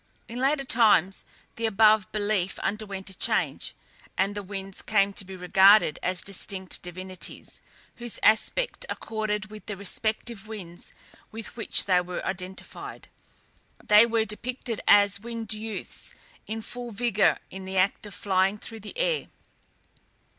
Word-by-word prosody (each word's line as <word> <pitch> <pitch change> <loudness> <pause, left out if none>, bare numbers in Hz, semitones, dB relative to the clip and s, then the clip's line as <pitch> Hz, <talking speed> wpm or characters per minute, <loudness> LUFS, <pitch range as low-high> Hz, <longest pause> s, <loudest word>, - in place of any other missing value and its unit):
In 235 +2 -6
later 275 +2 +2
times 215 -7 +3 0.3
the 230 0 +1
above 215 -1 +4
belief 205 -3 0
underwent 200 -2 -4
a - - -11
change, - - -1 0.4
and 200 +1 +2
the 205 - -4
winds 195 -1 -6
came 200 -2 +2
to 195 - -3
be 190 0 -9
regarded 190 -1 +5
as 180 -1 0
distinct 190 -1 -4
divinities, 185 +1 -5 0.4
whose 240 -1 -4
aspect 480 - +2
accorded 215 -1 -3
with 215 0 -11
the 210 -2 -4
respective 215 +2 -3
winds 185 -6 -7 0.4
with 225 -1 -7
which 230 - +3
they 180 -2 +4
were 180 0 -5
identified. 185 0 -6 0.7
They 210 +2 +6
were 225 -1 +1
depicted 235 +1 -4
as 200 -1 +6
winged 230 0 -5
youths 215 -1 -6 0.3
in 220 0 -4
full 245 +1 -5
vigour 215 -2 +2
in 190 0 -7
the 190 0 -3
act 195 +3 +2
of 205 - -10
flying 195 +1 +2
through 225 +1 -5
the 215 - -10
air. - - 0
210 Hz, 140 wpm, -27 LUFS, 190-225 Hz, 0.7 s, They